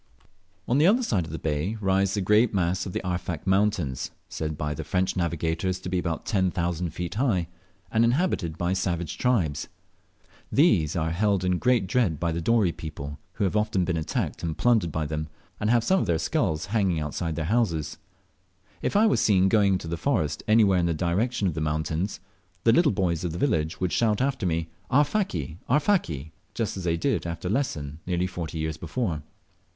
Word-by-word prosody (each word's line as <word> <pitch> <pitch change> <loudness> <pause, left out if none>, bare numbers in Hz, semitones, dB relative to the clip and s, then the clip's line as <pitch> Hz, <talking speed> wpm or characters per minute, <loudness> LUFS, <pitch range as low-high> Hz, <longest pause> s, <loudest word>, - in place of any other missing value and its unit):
On 125 +4 +2
the 155 - +5
other 235 +6 +4
side 95 - 0
of 80 - -9
the 80 - -4
bay 80 +8 -2
rise 95 0 +1
the 100 - 0
great 105 +3 +3
mass 90 +1 0
of - - -5
the - - -4
Arfak 90 -3 -3
mountains, 95 -9 +1 0.2
said 80 -1 -4
by 75 0 -2
the - - -5
French 95 0 0
navigators 85 +1 -1
to 90 - -6
be 90 -1 0
about 85 -3 -3
ten 95 -3 +1
thousand 85 -1 -1
feet 85 +2 -5
high, 105 -8 +1 0.4
and 110 +1 +3
inhabited 115 - +1
by 90 +1 0
savage 85 -4 -2
tribes. 95 - +1 0.8
These 95 - +3
are 80 -1 0
held 100 +1 +1
in 90 -1 +1
great 125 -5 +3
dread 95 -7 +1
by 85 -1 0
the 85 +1 -2
Dorey 105 -1 +3
people, 75 -2 -7
who 105 - -2
have 95 +1 0
often 105 -4 +1
been 90 - -1
attacked 80 -2 -2
and 80 -2 -3
plundered 110 -9 +3
by 80 +1 -2
them, 75 +1 -3 0.3
and 105 - 0
have 120 -1 +4
some 190 +9 +3
of - - -1
their 85 -1 +2
skulls 80 -1 0
hanging 95 -7 +2
outside 80 +2 -3
their 80 -1 -2
houses. 85 -7 0 0.8
If - - -1
I 210 +2 +6
was 165 - +3
seem 95 -4 +4
going 100 -2 +4
into 90 -3 -2
the 85 +1 -3
forest 80 - 0
anywhere 105 -4 +5
in 85 - +1
the 85 - 0
direction 100 +6 0
of 85 - 0
the 80 - -3
mountains, 80 +5 -1 0.4
the 115 - +5
little 155 +1 +4
boys 90 -4 0
of 85 -3 -2
the - - -4
village 80 - 0
would 90 -2 -1
shout 110 -3 +2
after 130 -7 0
me, 80 -1 -1 0.2
"Arfaki! 130 - +1
Arfaki?" 125 - +1 0.2
just 115 -3 -2
as 95 -2 -5
they 85 -1 +1
did 85 - 0
after 85 +2 -4
Lesson 80 - -2
nearly 90 0 0
forty 85 -3 -5
years 80 0 -2
before. 85 -1 -2
90 Hz, 200 wpm, -26 LUFS, 80-110 Hz, 0.8 s, I